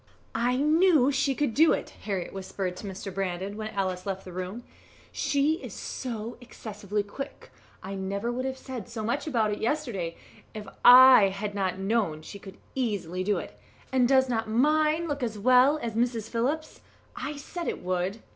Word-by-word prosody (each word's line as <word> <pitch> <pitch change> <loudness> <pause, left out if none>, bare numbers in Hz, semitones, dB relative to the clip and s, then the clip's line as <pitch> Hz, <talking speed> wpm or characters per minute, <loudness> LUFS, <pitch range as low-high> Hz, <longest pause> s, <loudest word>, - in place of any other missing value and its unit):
"I 240 +2 +1
knew 305 -1 +4
she 270 0 +1
could 290 -5 0
do 320 +5 +5
it," - - -3
Harriett 195 -4 -4
whispered 190 -1 -4
to 205 - -7
Mr. 195 0 -6
Brandon, 195 +1 -3
when 215 0 -4
Alice 185 -3 -2
left 195 -1 -4
the 180 - -9
room; 185 +6 -5 0.5
"she 295 +4 +1
is - - -8
so 235 -2 -5
excessively 210 -3 -4
quick. 240 +7 -8 0.3
I 195 - -6
never 200 +4 -2
would 255 +2 -3
have 265 0 -3
said 250 -4 -7
so 230 -2 -5
much 240 +8 -1
about 225 -7 +1
it 205 - -3
yesterday, 220 - -2 0.4
if 210 -1 -7 0.2
I 255 -4 +9
had 200 +2 -4
not 190 -2 -1
known 195 -6 0
she 200 - -9
could 195 -1 -12 0.2
easily 200 -8 -2
do 205 +2 +1
it; - - -8 0.3
and 255 -2 +3
does 265 0 +4
not 225 -3 -1
mine 305 +7 +2
look 290 -2 -3
as 225 -3 -2
well 255 +6 +5
as 230 -2 -3
Mrs. 230 -1 -1
Phillips's? 280 +7 -2 0.3
I 295 0 -5
said 340 +4 -6
it - - -3
would." 185 +4 -2
225 Hz, 180 wpm, -27 LUFS, 195-265 Hz, 0.5 s, I